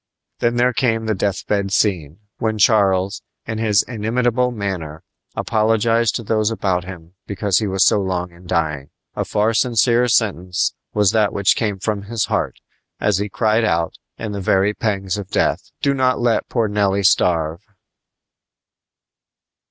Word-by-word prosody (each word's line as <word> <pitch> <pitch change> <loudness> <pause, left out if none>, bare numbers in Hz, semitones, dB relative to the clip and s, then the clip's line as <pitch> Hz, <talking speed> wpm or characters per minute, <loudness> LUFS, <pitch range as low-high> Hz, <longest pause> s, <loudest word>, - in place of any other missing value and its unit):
Then 120 0 +1
there 125 +1 +2
came 115 -2 0
the 110 - 0
death 95 -1 -2
bed 100 -2 -1
scene, 90 -4 0 0.2
when 110 -1 -1
Charles, 100 -3 +2 0.2
in 110 -1 -4
his 105 -3 +3
inimitable 120 +2 0
manner, 95 -8 -5 0.3
apologized 115 +1 +1
to 115 - -3
those 110 0 +1
about 95 -5 -1
him 90 -2 -10
because 100 -1 0
he 105 - -2
was 95 0 +2
so - - +4
long 90 -2 -2
in 85 +1 -16
dying. 75 -5 -1 0.3
A - - -1
far 105 +2 0
sincerer 120 +1 +2
sentence 95 -6 0 0.2
was 105 -3 +2
that 110 -2 +2
which 100 -1 +2
came 105 -4 -1
from 100 +1 -2
his 110 +2 -2
heart, - - -2 0.4
as 105 -2 +1
he 105 +1 -2
cried 110 +2 +1
out, 85 -6 0 0.2
in 110 -1 -5
the 100 -1 -4
very 95 +2 +2
pangs 105 -4 -2
of 100 -1 -8
death: - - 0
"Do 140 - +3
not 130 -1 +1
let 120 -1 0
poor 115 -3 0
Nelly 100 -1 0
starve!" 85 -2 +2
105 Hz, 160 wpm, -20 LUFS, 95-115 Hz, 0.4 s, so